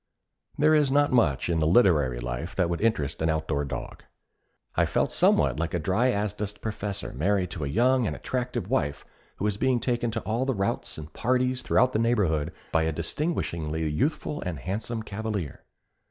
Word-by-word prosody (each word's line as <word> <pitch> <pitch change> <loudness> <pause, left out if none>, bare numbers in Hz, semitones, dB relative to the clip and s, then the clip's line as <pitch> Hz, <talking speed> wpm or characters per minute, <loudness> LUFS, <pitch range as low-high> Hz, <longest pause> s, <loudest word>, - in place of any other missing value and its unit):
There 155 +1 +4
is 150 -3 +4
not 145 +1 +3
much 75 - +2
in 85 -2 +1
the 80 - +2
literary 80 - +4
life - - -4
that 90 -2 +1
would 85 - -2
interest 80 -13 0
an 80 - +2
outdoor 80 -2 0
dog. 70 - -6 0.7
I - - +3
felt - - 0
somewhat - - +3
like 85 +1 -1
a - - 0
dry 95 +11 +2
as 105 -3 0
dust 105 -1 -5
professor 105 -2 -4
married 90 +4 0
to 85 -6 -4
a - - -1
young 120 - +3
and - - -2
attractive 125 -1 -3
wife 70 0 -1 0.3
who 100 - -3
is 105 -1 0
being 130 +1 +2
taken 120 0 0
to 110 - -3
all 115 +4 -1
the 135 -1 0
routs 100 0 -2
and 75 -1 -9
parties 125 +1 +1
throughout 125 +3 +3
the 110 - +1
neighborhood 90 -10 +1 0.2
by 80 - +3
a 80 0 +1
disgustingly 80 - -2
youthful 140 - -1
and 90 -5 -4
handsome 110 +4 -3
cavalier. 105 - -4
100 Hz, 185 wpm, -27 LUFS, 80-120 Hz, 0.7 s, There